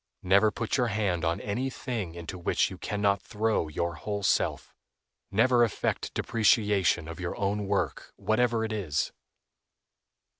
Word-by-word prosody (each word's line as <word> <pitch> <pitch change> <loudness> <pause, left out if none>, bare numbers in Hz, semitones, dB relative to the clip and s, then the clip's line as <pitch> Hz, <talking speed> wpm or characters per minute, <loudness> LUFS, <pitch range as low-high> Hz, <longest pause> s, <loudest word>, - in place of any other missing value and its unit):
Never 100 +4 +5
put 115 +4 -2
your 125 -2 +2
hand 100 -6 0
on 80 +2 0
any 120 +6 -2
thing 115 -10 -4
into 85 +2 -7
which 85 - +1
you - - -9
can 105 0 -3
not 100 -1 +3
throw 110 -5 0
your 85 +3 -2
whole 100 +4 -4
self; - - 0 0.6
never 120 +4 +4
affect 115 - -1
depreciation 105 -6 +2
of 80 +1 -8
your 90 -1 -4
own 100 0 -1
work, - - -1
whatever 115 0 +1
it 110 - -3
is. 85 -9 -1
100 Hz, 150 wpm, -28 LUFS, 90-110 Hz, 0.6 s, Never